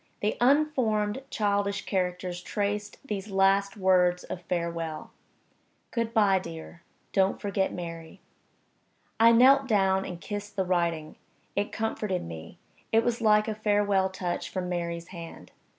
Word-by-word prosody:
The 210 - 0
unformed 255 -5 +2
childish 200 -1 0
characters 180 -1 -2
traced 205 +1 -3
these 205 -4 -4
last 195 +1 +2
words 180 -2 +3
of 180 - -6
farewell: 170 -2 -3 0.8
"Good 230 -2 -1
by, 205 -4 +4
dear. 170 -1 -9 0.3
Don't 190 0 +2
forget 195 -1 -1
Mary." 165 0 -7 1.0
I 230 +1 +7
knelt 265 +3 +6
down 195 -4 +2
and 180 -3 -6
kissed 205 +2 -6
the 190 -2 0
writing. 170 -4 -1 0.4
It 205 +1 -1
comforted 215 -4 -2
me 80 0 -9 0.3
it 225 0 +4
was 240 -1 -1
like 215 -1 +4
a 220 - -1
farewell 205 -2 +2
touch 185 -2 -3
from 185 -1 -3
Mary's 170 -1 -3
hand. 170 -3 -10
195 Hz, 135 wpm, -28 LUFS, 180-210 Hz, 1.0 s, I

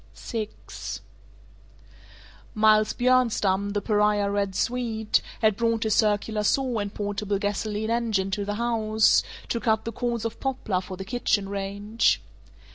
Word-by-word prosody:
VI 220 -3 -4 2.1
Miles 215 0 +4
Bjornstam, 215 -6 +2
the 205 - 0
pariah 210 -1 +2
"Red 200 -2 -1
Swede," 225 -3 0 0.2
had 215 -2 +4
brought 230 0 +1
his 220 -1 +1
circular 210 0 +1
saw 250 +2 +1
and 205 -1 -3
portable 205 -1 -2
gasoline 210 +2 -2
engine 220 -5 0
to 205 +1 -1
the 205 +1 -3
house, 220 -2 +3 0.3
to 235 - 0
cut 220 -2 +1
the 230 - -3
cords 235 0 -2
of 230 0 -4
poplar 250 -8 -1
for 185 0 -8
the 190 - -6
kitchen 220 -3 0
range. 200 +3 0
215 Hz, 135 wpm, -26 LUFS, 205-230 Hz, 2.1 s, Miles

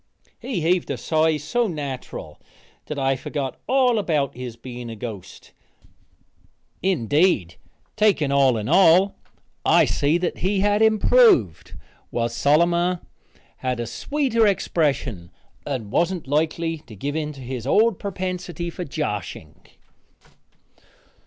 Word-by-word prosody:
He 225 -10 -3
heaved 175 +2 +1
a - - -2
sigh 160 -1 +1
so 235 - -1
natural 135 - -6 0.5
that 150 - -5
I 135 -1 +1
forgot 135 0 -5
all 255 -4 +3
about 150 -8 -1
his 125 -2 -7
being 120 -1 -8
a 115 - -6
ghost. 110 -5 -9 1.3
Indeed, 150 - +1 0.4
taken 205 -10 +2
all 135 -4 +4
in 105 0 -4
all, 185 +3 +5 0.5
I - - +5
see 145 +4 +1
that 175 0 -3
he 190 +2 0
had 205 +1 +2
improved, 220 - +4 0.3
was 120 0 -2
solemner, 170 +4 +2 0.6
had 125 -2 -2
a 120 - -2
sweeter 230 - 0
expression 140 - -1 0.4
and 125 -8 -4
wasn't 175 0 0
likely 160 +3 -1
to 110 - -11
give 145 +9 -4
in 155 -1 -2
to 135 - -12
his 125 -1 -6
old 215 +5 +3
prepensity 180 -3 -4
for 180 - -5
joshing. 105 - -5
155 Hz, 125 wpm, -23 LUFS, 130-185 Hz, 1.3 s, all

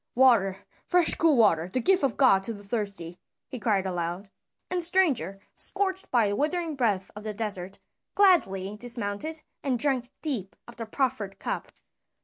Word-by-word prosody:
"Water! 225 -7 +4 0.2
Fresh 355 -2 +4
cool 320 -5 +4
water, 170 -7 +4
the 255 - +1
gift 375 +7 +3
of 265 -4 +1
God 225 -8 +5
to 230 - -2
the 205 -1 -11
thirsty!" 200 -5 -4 0.3
he 255 - -6
cried 200 -3 +1
aloud. 180 +2 -3 0.4
And 360 -1 0
the - - 0
stranger, 290 - +1 0.2
scorched 380 -1 -2
by 235 -5 +3
the 200 - -1
withering 320 - -1
breath 210 -8 0
of 210 - -8
the 215 -1 -5
desert, 200 -3 -4 0.4
gladly 210 - +3
dismounted 240 +6 -4 0.2
and 265 -3 +1
drank 255 -2 0
deep 235 - -2
of 240 - -13
the 230 -2 -5
proffered 220 -6 -2
cup. - - -4
230 Hz, 165 wpm, -27 LUFS, 195-285 Hz, 0.4 s, God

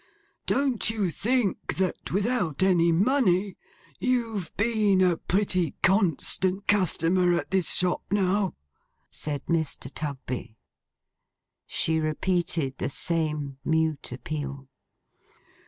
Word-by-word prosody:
Don't 270 -6 +1
you 210 -6 -1
think 230 +1 -1
that, 185 -1 -2
without 200 - 0
any 175 -3 +4
money, 195 -1 +2 0.4
you've 230 -8 -1
been 210 -3 +2
a 180 -3 +3
pretty 185 -5 0
constant 190 +1 +2
customer 180 -2 +3
at 170 - -3
this 190 -3 +2
shop, 180 -1 +1
now?' 195 0 +1 0.6
said 145 -2 -4
Mr. 160 -5 -2
Tugby. 130 -6 -5 1.1
She 160 0 +1
repeated 160 -2 -1
the - - -1
same 150 -3 -1
mute 160 -3 0
appeal. 140 +1 -5
180 Hz, 100 wpm, -26 LUFS, 155-200 Hz, 1.1 s, any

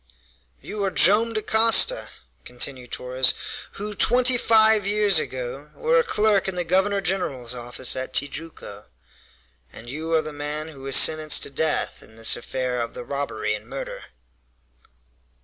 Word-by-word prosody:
"You 210 -1 -6
are 195 - +1
Joam 210 +5 +4
Dacosta," 220 +1 +3 0.3
continued 125 0 -4
Torres, 130 +1 +1 0.4
"who, 210 +1 -6
twenty 250 +4 +4
five 220 -3 +4
years 205 -4 +3
ago, 130 +3 -6
were 480 +1 +2
a - - +2
clerk 210 - +1
in 190 - -3
the 180 - -1
governor 190 +4 +1
general's 140 -11 -3
office 120 +1 -3
at 130 0 -5
Tijuco, 145 -8 -5 0.9
and 120 +1 -11
you 160 +3 -6
are 160 - +2
the 155 - -6
man 150 +2 -4
who 145 -4 -13
was 135 0 +2
sentenced 155 -1 +5
to - - -5
death 155 +2 -2
in 110 - -15
this 115 0 0
affair 125 0 -4
of 115 - -6
the - - -7
robbery 120 -5 -3
and 105 +1 -8
murder!" 135 +2 -7
155 Hz, 150 wpm, -23 LUFS, 130-205 Hz, 0.9 s, sentenced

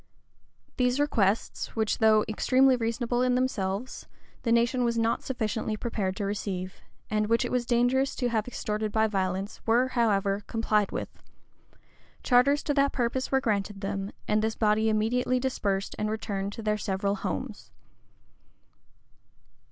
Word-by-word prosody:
These 250 +1 +2
requests, 220 -8 0
which, 220 -1 0
though 215 -1 +5
extremely 255 +4 +3
reasonable 240 +1 -1
in 250 0 +2
themselves, 245 -2 -2 0.3
the 235 - -1
nation 235 +2 +3
was 235 -1 0
not 230 0 +1
sufficiently 220 -3 -2
prepared 205 -5 -2
to 205 - -3
receive, 195 -2 -4 0.3
and 215 0 +1
which 230 +3 +2
it - - -4
was 245 -1 0
dangerous 250 +3 +2
to 245 -2 -1
have 220 -1 -1
extorted 215 -3 -3
by 220 +1 +3
violence, 195 -1 -2
were, 245 +3 +3
however, 205 -5 +1
complied 215 -2 +1
with; - - -6 1.0
charters 275 +4 +4
to 290 - 0
that 280 0 +2
purpose 250 +1 -1
were 265 0 +3
granted 205 -3 -1
them; 195 0 -3 0.2
and 215 0 +2
this 220 0 -1
body 220 0 +2
immediately 245 +4 +1
dispersed, 200 -7 -2
and 215 0 0
returned 205 -2 -3
to 225 - -7
their 210 0 0
several 200 +1 -1
homes. 205 - -5
220 Hz, 145 wpm, -27 LUFS, 205-245 Hz, 1.0 s, though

